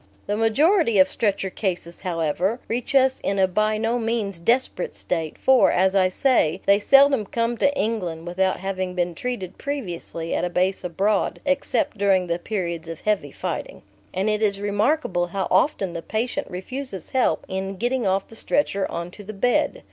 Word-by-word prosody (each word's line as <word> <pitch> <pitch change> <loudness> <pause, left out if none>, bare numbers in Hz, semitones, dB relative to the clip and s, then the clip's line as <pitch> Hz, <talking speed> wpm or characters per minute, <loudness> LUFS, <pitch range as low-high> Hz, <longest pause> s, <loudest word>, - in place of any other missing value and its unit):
The 205 - -1
majority 230 - +3
of 185 - +7
stretcher 195 -3 -1
cases, 175 -4 -3
however, 180 +5 -1
reach 245 +4 -3
us 265 -1 +4
in 195 - -1
a 190 -1 +4
by 215 +3 +1
no 225 +2 0
means 220 -5 -2
desperate 230 0 0
state, 165 -3 -3
for, 265 -1 +5
as 190 +1 +2
I 190 -2 +4
say, 185 - +2
they 200 +1 +5
seldom 275 +1 +5
come 230 +2 -1
to 285 - +3
England 180 -7 -2
without 185 +2 0
having 185 -1 -3
been 175 -1 0
treated 195 -2 -5
previously 175 - -4
at - - 0
a 180 - 0
base 185 +2 0
abroad 195 +4 0
(except 275 -6 0
during 195 -2 +3
the 170 0 -2
periods 170 -5 -3
of 165 -1 -7
heavy 210 -2 0
fighting). - - -5 0.3
And 190 +3 -1
it 215 0 +1
is 200 -2 +1
remarkable 205 - 0
how 190 +2 -2
often 195 - +2
the 170 - -4
patient 240 - -2
refuses 195 - -6
help 260 -1 +1
in 190 +1 -4
getting 240 +1 0
off 190 +1 0
the 225 - -14
stretcher 210 -5 0
on 170 +1 -5
to 205 - -11
the 215 +2 -8
bed. 245 - +1
200 Hz, 180 wpm, -23 LUFS, 180-235 Hz, 0.3 s, of